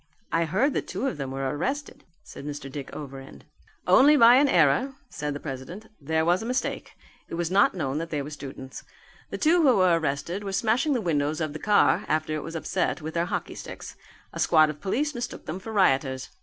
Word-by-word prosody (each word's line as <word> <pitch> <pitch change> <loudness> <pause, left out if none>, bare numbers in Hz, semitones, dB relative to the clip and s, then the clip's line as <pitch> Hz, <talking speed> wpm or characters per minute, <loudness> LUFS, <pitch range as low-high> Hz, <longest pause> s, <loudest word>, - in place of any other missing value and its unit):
"I 165 0 +2
heard 215 - +1
that - - -2
two 200 +8 -3
of 270 - -2
them 135 -2 -4
were 135 0 -3
arrested," 270 - -4 0.2
said - - -11
Mr. 145 -1 -6
Dick 140 -1 -7
Overend. 135 -2 -9 0.4
"Only 295 +3 +6
by 235 0 +8
an 285 +2 +5
error," 175 - +3 0.2
said 150 -1 -4
the - - -5
president. 145 +10 -7 0.2
"There 160 +2 0
was 175 +2 +2
a - - -5
mistake. 255 +1 -3 0.3
It - - -5
was 170 0 -2
not 195 0 +4
known 140 -4 -2
that 165 0 -5
they 150 -3 -2
were 145 - -8
students. 135 -2 -9 0.5
The - - -4
two 335 +3 +3
who 265 -6 +5
were 180 -3 +4
arrested 160 +6 -3
were 195 -1 -4
smashing 240 +9 +1
the 245 - 0
windows 155 -4 0
of 155 -2 -2
the 155 - -6
car, 205 +3 +3
after 155 0 0
it 155 - -3
was 165 +2 -7
upset, 175 +3 -1
with 155 0 -6
their 170 0 0
hockey 180 - -4
sticks. - - -9 0.4
A - - -7
squad 155 -2 +4
of 150 0 -14
police 290 +10 -1
mistook 245 -1 -6
them 160 +4 -5
for 220 +4 -8
rioters. 135 -9 +1
165 Hz, 215 wpm, -26 LUFS, 145-215 Hz, 0.5 s, by